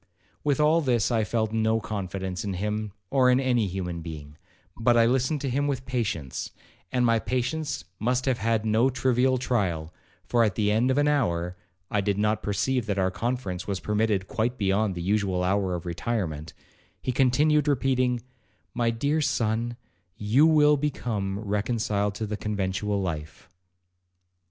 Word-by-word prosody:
With 145 -1 +1
all 155 +2 +4
this 125 -5 +1
I 115 -2 +2
felt 110 0 -1
no 110 0 +2
confidence 95 -3 -4
in 100 -2 -3
him, 105 +2 -2 0.2
or 130 -2 +4
in 125 +1 +4
any 125 -5 +2
human 90 -2 -4
being; 75 -3 -8 0.4
but 120 +1 +3
I 115 - +6
listened 130 +4 +1
to 140 - -2
him 140 +3 +1
with 130 -2 -2
patience, 110 - -3 0.4
and 125 -1 +2
my 115 -1 +3
patience 130 +7 -2 0.2
must 125 +3 0
have 130 -3 +1
had 110 0 0
no 110 +4 +3
trivial 130 0 +2
trial, 90 -11 -1 0.3
for, 120 -1 +3
at 105 -5 +1
the 105 0 +1
end 115 +4 +2
of 130 - +2
an 145 0 +3
hour, 90 -12 0 0.4
(I 105 - +2
did 100 0 0
not 105 +1 +1
perceive 115 +4 0
that 100 -2 -1
our 95 -1 +1
conference 105 -4 -3
was 100 -2 -2
permitted 105 -2 0
quite 120 0 -1
beyond 100 0 +1
the 85 - -4
usual 95 -2 +1
hour 95 -1 +1
of 85 - -6
retirement), 85 -4 -3 0.4
he 130 - -2
continued 145 +4 +3
repeating, 130 -3 +1 0.5
'My 120 -1 +1
dear 145 +7 0
son, 115 -3 0 0.4
you 120 +9 +4
will 150 -2 +5
become 115 -9 -2
reconciled 105 -1 -1
to 110 - -3
the 105 0 -4
conventual 100 -1 -1
life.' 80 -1 -5
110 Hz, 165 wpm, -26 LUFS, 100-125 Hz, 0.5 s, I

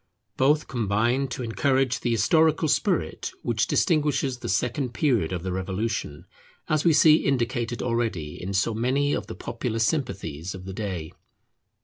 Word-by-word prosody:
Both 150 +3 +2
combine 120 +3 0
to 125 0 -5
encourage 130 +2 +1
the 120 - -2
historical 155 +8 +3
spirit - - 0
which 115 -2 0
distinguishes 145 -6 +1
the - - -5
second 120 +5 -1
period 110 - +1
of 90 -2 -3
the 95 - -3
Revolution, 95 -3 -3 0.4
as 155 -1 +1
we 170 - +5
see 155 0 +6
indicated 120 -3 -1
already 115 -11 -2
in 95 +2 -4
so 100 +4 +1
many 130 +6 +1
of - - -3
the - - -7
popular 110 - -4
sympathies 100 - -2
of 90 0 -9
the 95 - -6
day. 95 -6 -4
120 Hz, 150 wpm, -25 LUFS, 100-140 Hz, 0.4 s, see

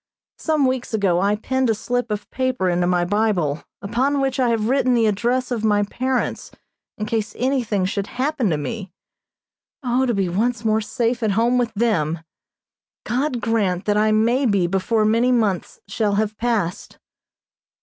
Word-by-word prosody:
Some 310 -3 +1
weeks 255 -3 -1
ago 185 -4 +2
I 200 +1 +2
pinned 260 +4 -1
a 225 - +2
slip 245 +3 -2
of 210 -1 -3
paper 255 -7 0
into 175 0 +1
my 175 -1 +2
Bible, 185 -7 0 0.2
upon 255 +7 0
which 270 0 -1
I 250 -2 +3
have 225 -2 0
written 255 -1 +2
the 230 -1 +3
address 240 +5 0
of 230 -3 -2
my 205 -1 +3
parents, 255 +5 -2 0.5
in 215 - -3
case 220 0 -2
anything 245 -7 0
should 200 +1 -2
happen 265 -3 -1
to 155 - +1
me. 195 +5 -5 0.9
O, 255 +1 +1
to 240 - +1
be 195 -2 +1
once 225 +5 -1
more 220 0 +2
safe 235 +3 -1
at 215 -3 +1
home 235 +4 +2
with 240 -2 0
them! 170 -8 0 0.8
God 255 0 -1
grant 205 -6 0
that 205 - +1
I 215 +1 +3
may 235 +5 +2
be 200 -5 +2
before 195 +5 +1
many 230 +4 +3
months 215 -7 0
shall 205 0 0
have 215 +1 0
passed. 210 -6 -2
220 Hz, 170 wpm, -21 LUFS, 200-245 Hz, 0.9 s, I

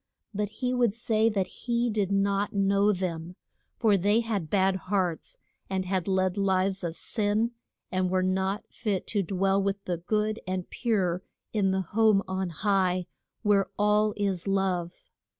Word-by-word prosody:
But 205 0 -1
he 250 +3 -2
would 240 -4 +2
say 225 -1 +2
that 200 -4 0
he 240 +3 -2
did 205 -4 0
not 200 +1 +1
know 200 +1 +3
them, 180 -2 -3 0.4
for 215 -4 +4
they 205 +5 +3
had 205 -8 -2
bad 190 -1 +3
hearts, 185 - -2 0.3
and 190 -1 -1
had 185 -1 -1
led 190 0 +1
lives 190 -1 +1
of 165 -1 -3
sin, 215 +3 0 0.4
and 185 0 +1
were 185 0 +1
not 190 +2 0
fit 200 -4 -2
to 205 - +2
dwell 195 +1 +1
with 200 0 -1
the 175 -1 -1
good 215 +5 -1
and 185 -1 -2
pure 190 -7 0 0.3
in 200 -3 +2
the 190 0 +1
home 210 +2 +3
on 190 -1 -2
high, 185 +1 +1 0.4
where 200 -2 +3
all 210 0 +3
is 195 -3 -1
love. 185 -3 -1
195 Hz, 160 wpm, -28 LUFS, 185-210 Hz, 0.4 s, for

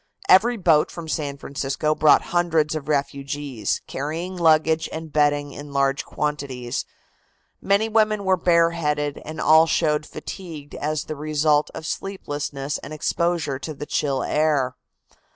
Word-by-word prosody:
Every 230 +6 +5
boat 165 -6 +3
from 170 -2 -8
San 145 -3 -3
Francisco 140 +2 -2
brought 155 -1 +5
hundreds 165 -3 +2
of 155 -2 -5
refugees, 140 -5 -2
carrying 165 +7 -4
luggage 160 -2 +3
and 160 -2 -7
bedding 145 -1 +2
in 145 0 -9
large 140 0 +1
quantities. 140 -5 -3 0.8
Many 200 +3 +2
women 215 -2 +2
were 190 0 +4
bareheaded 165 -4 +1
and 155 0 -7
all 160 +1 +6
showed 150 -2 +1
fatigue 155 -2 -8
as 150 0 -2
the 155 - -6
result 150 0 +1
of 160 - -7
sleeplessness 145 -7 -4
and - - -10
exposure 155 -2 -1
to 155 +2 -6
the 150 - -6
chill 140 -3 -1
air. 145 -4 +1
150 Hz, 135 wpm, -23 LUFS, 145-165 Hz, 0.8 s, all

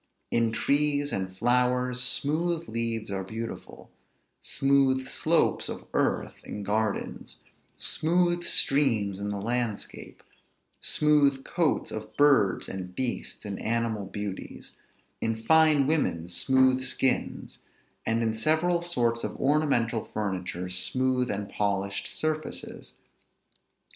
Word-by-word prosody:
In 115 -1 +2
trees 145 +3 +1
and 95 -1 -2
flowers, 125 +2 +2
smooth 160 +6 +2
leaves 115 -2 -3
are 95 -1 -2
beautiful; 110 +4 -8 0.5
smooth 135 -1 +2
slopes - - +1
of - - -7
earth - - -1
in 105 - -6
gardens; 105 +1 -2 0.4
smooth 175 +1 +1
streams 115 - +2
in 100 0 -3
the 100 -1 -3
landscape; 115 0 -4 0.6
smooth 145 -3 +3
coats 170 -4 0
of 110 0 -7
birds 140 -10 +4
and 90 -1 -6
beasts 125 -3 -3
in 100 -2 -5
animal 115 -3 -1
beauties; 100 -1 -7 0.5
in 115 0 -2
fine 155 0 +5
women, 135 - 0
smooth 130 +7 +3
skins; 130 0 -1 0.4
and 115 +1 0
in 110 -1 0
several 160 +9 +1
sorts 120 -9 0
of - - -4
ornamental 135 -6 +1
furniture, 90 -4 -4
smooth 125 +8 0
and 100 0 -3
polished 100 -1 -2
surfaces. 155 0 -5
120 Hz, 110 wpm, -27 LUFS, 105-145 Hz, 0.6 s, fine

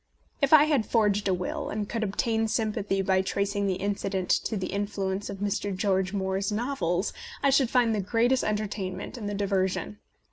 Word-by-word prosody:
If 280 - +2
I 310 -2 +9
had 290 -7 +1
forged 210 -3 +2
a 190 - +3
will, 180 0 -4
and 210 -1 -3
could 230 - -3
obtain 220 +2 0
sympathy 210 -3 0
by 190 0 +3
tracing 200 +1 -1
the 190 - +1
incident 195 -1 -2
to 220 - -1
the 185 -1 -4
in 200 0 0
fluence 195 0 -3
of 200 - -5
Mr. 205 -1 -2
George 190 -1 +1
Moore's 195 0 -1
novels, 210 -6 -1 0.3
I 275 - +4
should 265 -3 +3
find 240 -3 +3
the 210 - 0
greatest 235 +6 +2
entertainment 205 -3 -3
in 220 -5 -5
the 205 - -3
diversion. 195 0 -1
205 Hz, 185 wpm, -27 LUFS, 190-220 Hz, 0.3 s, I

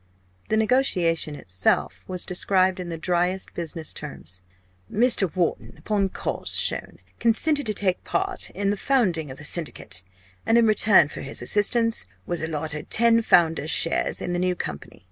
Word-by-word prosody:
The 220 - +1
negotiation 180 - +1
itself 95 -7 -1
was 180 -1 -3
described 185 0 +1
in 180 -1 -5
the 165 - -5
driest 180 +3 -1
business 165 -2 -4
terms. 95 -11 -7 0.5
"Mr. 225 -4 +4
Wharton, 175 -3 -2
upon 200 -2 -1
cause - - -4
shown, - - -1 0.2
consented 285 +5 +3
to 215 - 0
take 185 -3 0
part 385 0 -2
in 200 +1 -1
the 205 - -2
founding 185 - 0
of 130 - -9
the 145 - -9
Syndicate, 150 - -2 0.4
and 225 - +3
in 235 - +5
return 210 -6 +5
for - - -8
his 135 -2 -5
assistance, 230 - +3 0.2
was 175 -1 -3
allotted 155 -1 -4
ten 230 0 +4
founders' 165 -6 +2
shares 165 - -1
in 175 - -3
the 175 - -1
new 180 0 0
company. 75 - -7
180 Hz, 160 wpm, -24 LUFS, 160-220 Hz, 0.5 s, in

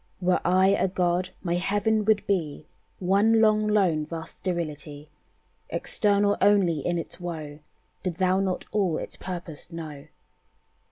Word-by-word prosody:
"Were 180 -1 +2
I 185 +2 +4
a 195 -1 +2
God, 180 0 0
my 170 -2 -1
heaven 205 +4 +1
would 215 -1 +2
be 160 -7 -1 0.3
One 200 +5 +3
long, 215 -1 +4
lone, 180 -8 +2
vast 165 -1 -7
sterility, 150 -4 -5 0.6
Eternal 205 -1 +1
only 195 -6 +4
in 175 +5 -1
its 170 +1 -6
woe 155 -4 -6 0.4
Did 180 -3 -3
thou 185 +1 +2
not 190 -2 -1
all 190 -7 +1
its - - -6
purpose 175 -3 -7
know. 155 -4 -8
180 Hz, 135 wpm, -26 LUFS, 165-200 Hz, 0.6 s, I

